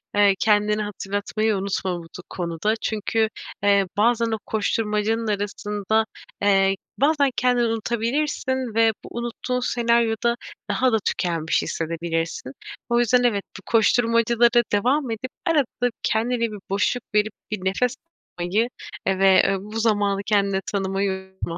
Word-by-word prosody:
eee, 205 -1 +5
kendine 210 0 +2
hatırlatmayı 205 +1 -2
unutma 190 -2 -2
bu - - -10
du 165 +2 -11
konuda. 175 +4 -1
Çünkü, 220 +1 0 0.3
eee, 200 -1 +4
bazen 230 +1 +2
o 220 - 0
koşturmacanın 220 +1 0
arasında, 210 +1 -1 0.4
eee, 195 -1 +4 0.2
bazen 285 -1 +3
kendini 245 -1 +2
unutabilirsin 240 +2 -1
ve 225 0 +5
bu - - -10
unuttuğun 240 +1 -3
senaryoda 235 -1 +1 0.3
daha 255 0 +2
da 225 - +3
tükenmiş 165 -3 0
hissedebilirsin. 165 -4 -3 0.4
O 235 0 +3
yüzden 245 +1 +3
evet, 210 -5 +2
bu - - -11
koşturmacalara 230 +1 +3
devam 255 +5 +2
edip 255 +4 -5
arada 275 -7 +1
kendine 235 +3 0
bir 230 -2 -1
boşluk 200 +5 0
verip 210 0 +2 0.2
bir 200 -3 -4
nefes 245 +6 +1 0.4
almayı, 200 +7 +1 0.4
eee, 190 -1 +1
ve 195 -1 +6 0.2
bu 210 +3 -6
zamanı 205 -3 +1
kendine 200 -2 +1
tanımayı 195 0 0 0.2
unutma. 170 -3 -5
215 Hz, 130 wpm, -23 LUFS, 195-235 Hz, 0.4 s, ve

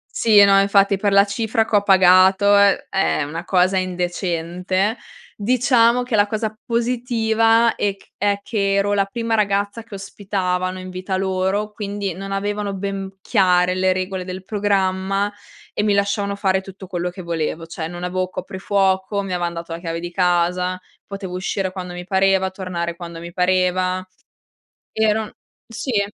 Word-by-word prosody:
Sì, 215 -3 +6
no, 195 0 +5
infatti, 200 0 +3
per 200 +1 0
la 200 0 +6
cifra 220 +2 0
che 215 - +2
ho 200 - +3
pagato 190 +1 +5
è 200 0 +3
è 195 -5 +1
una 165 +4 -6
cosa 185 +1 +2
indecente. 180 +2 -1 0.4
Diciamo 245 +1 +3
che 245 -2 -1
la 205 0 +4
cosa 215 0 -3
positiva 230 -1 +2
è 200 -1 0 0.2
è 200 0 0
che 200 -2 0
ero 200 +1 +1
la 200 -1 +2
prima 230 +3 -3
ragazza 205 +1 0
che 225 -2 -12
ospitavano 185 -2 -3
in 185 0 -8
vita 185 +1 -3
loro, 190 +2 -1
quindi 200 -3 -4
non 195 +2 -7
avevano 205 +1 -2
ben 195 0 -5
chiare 180 -3 +2
le 185 0 +2
regole 185 0 -3
del 185 0 -7
programma 195 -1 0 0.4
e - - 0
mi 210 - +2
lasciavano 200 0 0
fare 190 -1 +1
tutto 190 0 -11
quello 180 -1 -2
che 185 +1 -9
volevo. 165 -1 -3
Cioè 165 -1 -5
non 175 +1 -7
avevo 185 +1 -2
coprifuoco, 190 +1 -1
mi 195 -2 -5
avevan 175 -1 -2
dato 170 0 -7
la 165 - -4
chiave 165 -1 -4
di 175 0 -6
casa, 180 0 +1 0.3
potevo 195 -2 -7
uscire 185 +1 -2
quando 185 -1 -7
mi 175 0 -7
pareva, 190 0 +2
tornare 175 -3 -4
quando 170 -1 -8
mi 170 +1 -9
pareva. 185 0 +1 0.9
Ero 220 0 0 0.3
sì. 230 -2 -1
195 Hz, 160 wpm, -20 LUFS, 185-205 Hz, 0.9 s, Sì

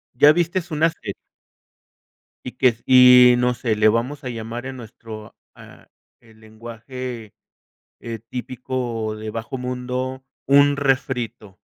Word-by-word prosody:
¿Ya 145 +4 +7
viste 175 +2 -1
unas 160 +2 +1
que? 100 - -5 1.3
Y 125 - -5
que 125 -2 +4
si, 125 +1 +7
no 125 0 +1
sé, 120 -2 -2
le 110 0 +4
vamos 125 +6 -1
a - - -3
llamar 115 +1 -6
en 135 0 -6
nuestro, 110 -2 -11 0.2
ah, - - -16 0.3
el 110 -2 -22
lenguaje, 115 +1 -9 0.7
eh, 115 -1 -7
típico, 125 -3 -4
de 110 0 -7
bajo 115 +4 -6
mundo, 125 +1 -4 0.2
un 140 +1 +4
refrito, 125 -7 -2
125 Hz, 130 wpm, -21 LUFS, 115-130 Hz, 1.3 s, Ya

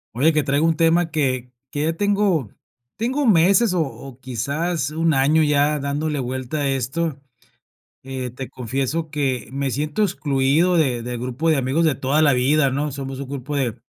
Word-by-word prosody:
Oye, 155 +6 +3
que 155 - +3
traigo 145 +2 +1
un 165 -1 +2
tema 165 +1 +2
que 130 -5 -1 0.2
que 145 - -2
ya 160 +1 +1
tengo 200 - +1 0.5
tengo 260 +5 0
meses 195 +2 +4
o 170 - +2
o 135 -2 -9
quizás 140 +5 -2
un 165 +2 0
1 - - +3
año 145 +4 +3
ya 150 0 +2
dándole 145 +2 -2
vuelta 130 +3 -4
a 140 - 0
esto. 135 +3 -2 0.8
Eh, 130 -1 -5
te 130 +2 -7
confieso 135 +6 -3
que 130 -7 -2
me 140 0 -1
siento 150 - -1
excluido 150 +1 +1
de 130 -7 +1
del 120 0 -4
grupo 130 +7 -1
de 155 - +3
amigos 135 +6 +1
de 155 -3 +3
toda 140 +4 +1
la 145 -2 +5
vida, 135 +3 +3
¿no? 145 +3 -1
Somos 135 0 -6
un 140 - -6
grupo 140 +1 -4
de, 125 -4 -1
145 Hz, 185 wpm, -21 LUFS, 130-160 Hz, 0.8 s, la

